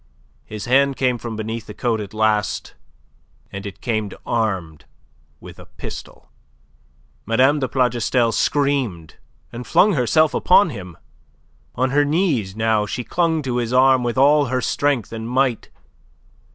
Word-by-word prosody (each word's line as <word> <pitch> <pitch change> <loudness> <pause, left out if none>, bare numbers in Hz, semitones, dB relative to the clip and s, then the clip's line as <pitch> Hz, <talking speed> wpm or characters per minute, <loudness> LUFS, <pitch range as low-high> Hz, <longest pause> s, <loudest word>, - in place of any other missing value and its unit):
His 105 -2 -7
hand 135 +2 +3
came 125 -2 0
from 115 -1 -6
beneath 110 +1 -5
the 105 - -9
coat 115 -3 -1
at 100 - -8
last, 110 -2 -1 0.8
and 100 +1 -6
it 100 - -10
came 110 -4 -2 0.2
armed 95 -9 -2 0.5
with - - -13
a - - -13
pistol. - - -10 1.0
Mme. 130 +6 +3
de 130 - -1
Plougastel 125 -2 +1
screamed, 130 - -1 0.4
and 120 +1 -7
flung 205 +1 +4
herself 155 +3 +2
upon 200 +3 +4
him. 90 -6 -9 0.8
On 130 +1 0
her 145 +1 +3
knees 145 - 0
now, 110 -1 +1
she 125 +4 -4
clung 165 +1 0
to 125 -2 -2
his 120 0 -2
arm 130 0 +5
with 120 +1 -2
all 145 +2 +4
her 130 0 -1
strength 130 -4 -1
and 115 0 -6
might. 130 -2 0
120 Hz, 145 wpm, -20 LUFS, 110-135 Hz, 1.0 s, arm